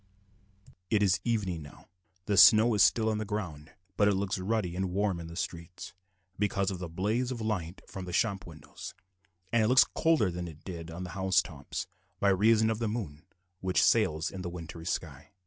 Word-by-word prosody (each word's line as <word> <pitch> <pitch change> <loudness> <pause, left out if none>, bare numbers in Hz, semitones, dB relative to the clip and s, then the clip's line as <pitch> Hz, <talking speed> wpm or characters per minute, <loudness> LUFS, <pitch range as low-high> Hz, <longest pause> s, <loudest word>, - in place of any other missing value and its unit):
It 105 -2 +3
is 95 -3 +3
evening 100 -8 -1
now. 70 -1 -13 0.4
The 105 - 0
snow 110 +3 +8
is 105 - +2
still 110 +2 +4
on 110 -1 0
the - - -1
ground; 85 -8 -5 0.3
but 100 - +4
it 100 - +3
looks 95 0 -1
ruddy 95 -2 -1
and 95 0 -1
warm 95 -1 0
in 85 - -7
the 85 - -9
streets, 85 -1 -6 0.5
because 100 -1 0
of 95 - -5
the 90 -2 -5
blaze 105 +9 -1
of 125 -2 -4
light 95 -6 -3
from 95 -3 -7
the 90 - -6
shop 95 +1 0
windows, 80 -3 -10 0.6
and 115 - +4
it 110 - +3
looks 130 +3 +6
colder 160 - +2
than 90 0 -5
it 80 -2 -12
did 85 -3 -7
on 85 +3 -6
the 90 - -7
house 95 -1 +2
tops, 75 -7 -6 0.3
by 100 - +3
reason 110 +3 +4
of 110 - -3
the 115 - -1
moon 90 -9 -5 0.3
which 95 -1 +1
sails 80 +1 +2
in 95 - -7
the 90 - -4
wintry 85 -1 -8
sky. 80 -2 -5
95 Hz, 200 wpm, -30 LUFS, 85-110 Hz, 0.6 s, snow